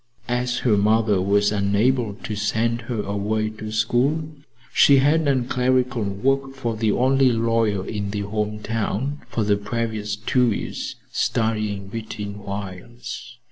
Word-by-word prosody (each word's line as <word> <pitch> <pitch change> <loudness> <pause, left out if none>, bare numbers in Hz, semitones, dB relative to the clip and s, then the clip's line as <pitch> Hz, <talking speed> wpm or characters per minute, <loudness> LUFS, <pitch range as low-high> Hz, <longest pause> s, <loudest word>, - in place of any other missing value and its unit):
As 125 0 0
her 110 -4 +4
mother 105 -1 +3
was 100 +2 +3
unable 105 +3 +1
to 105 - -3
send 110 +3 0
her 110 -4 -1
away 105 +2 -1
to 110 0 -7
school, 125 +8 +1 0.4
she 140 - +6
had 150 +4 +3
done 130 -4 +1
clerical 125 -1 +1
work 135 +7 0
for 120 -4 -2
the 110 -1 +1
only 130 +2 +3
lawyer 115 -4 +1
in 100 -2 -3
the 100 0 -2
home 105 +1 -2
town 115 +6 -2
for 115 - -1
the 105 0 +2
previous 105 0 -2
two 120 +3 +2
years, 100 - -4 0.2
studying 105 -4 -1
between 105 -1 -6
whiles. 105 +5 -7
110 Hz, 140 wpm, -23 LUFS, 105-125 Hz, 0.4 s, she